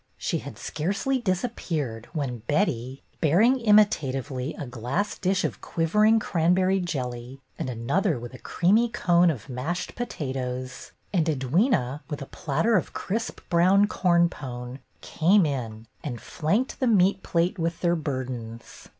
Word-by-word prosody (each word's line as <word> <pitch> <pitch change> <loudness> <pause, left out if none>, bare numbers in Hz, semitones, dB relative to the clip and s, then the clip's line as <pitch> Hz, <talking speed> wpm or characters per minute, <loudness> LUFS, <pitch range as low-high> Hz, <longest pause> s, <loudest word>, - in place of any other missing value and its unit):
She - - -1
had - - -9
scarcely 200 - -1
disappeared 175 - -2
when 135 -7 -3
Betty, 135 - 0 0.2
bearing 210 - +4
imitatively 145 - +2
a 145 - -6
glass 130 - -2
dish 185 0 0
of - - -3
quivering 210 +7 +3
cranberry 185 +1 +2
jelly 130 -6 -4 0.2
and - - -2
another 140 - 0
with 120 +1 -8
a 130 - -10
creamy 215 +7 +2
cone 175 -6 +3
of 135 -9 -4
mashed 140 +7 -3
potatoes, 130 - -5 0.2
and 170 -4 +2
Edwyna, 150 - +1
with 145 - -4
a 135 - -6
platter 165 +11 0
of 180 - -3
crisp 225 +4 -3
brown 185 +4 +5
corn 175 -4 +3
pone, 125 -4 -7 0.2
came 180 +3 +3
in, 115 -6 -4 0.2
and 125 -6 -4
flanked 205 - -1
the 260 - +1
meat 195 -3 +4
plate 175 +2 0
with 165 0 -2
their 175 -1 +2
burdens. 125 -6 -6
165 Hz, 140 wpm, -26 LUFS, 130-195 Hz, 0.2 s, brown